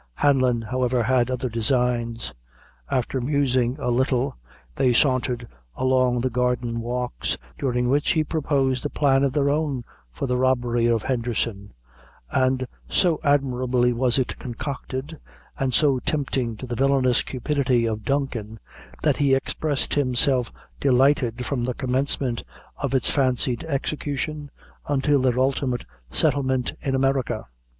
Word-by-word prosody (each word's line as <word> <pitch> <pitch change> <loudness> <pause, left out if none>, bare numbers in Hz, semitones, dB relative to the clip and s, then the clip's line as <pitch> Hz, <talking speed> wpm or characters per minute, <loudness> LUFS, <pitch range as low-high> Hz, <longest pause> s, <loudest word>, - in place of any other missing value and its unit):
Hanlon, 130 - +2
however, 125 +1 0
had 125 +1 +2
other 130 0 -2
designs. 120 0 0 0.6
After 130 +1 -1
musing 130 -2 +1
a 135 -4 -1
little, 130 +1 +1 0.4
they 125 -2 +3
sauntered 125 -2 +1 0.3
along 130 -2 +2
the 130 - 0
garden 125 -1 0
walks, 125 +1 -2 0.2
during 125 -2 0
which 145 +3 +2
he 160 -2 +2
proposed 140 -5 0
a 145 - -1
plan 135 -2 +2
of 140 - +2
their 140 -1 +2
own 145 -4 -1 0.3
for 60 - -4
the 125 -1 0
robbery 120 -2 +2
of 115 -2 +1
Henderson; 115 -5 -2 0.6
and 130 0 +1 0.2
so 175 -5 +2
admirably 130 -3 +2
was 125 +1 +2
it 130 - -1
concocted, 135 +4 -5 0.4
and 135 -1 0
so 130 +3 +3
tempting 130 -6 -1
to 130 - -7
the 120 -1 -4
villainous 130 -1 +3
cupidity 130 -2 0
of 110 -1 -3
Duncan, 120 -6 -2 0.4
that - - +2
he 140 -2 +3
expressed 145 +1 -1
himself 130 -2 +2 0.3
delighted 130 -2 +2
from 125 -2 -2
the 125 0 -2
commencement 130 -2 -1 0.3
of 135 -2 -2
its 130 - +3
fancied 130 -2 +2
execution 145 0 -3 0.4
until 145 0 +2
their 125 -1 +1
ultimate 130 -1 0 0.2
settlement 130 -3 +1
in 135 -1 -1
America. 135 -1 0
130 Hz, 135 wpm, -24 LUFS, 120-140 Hz, 0.6 s, they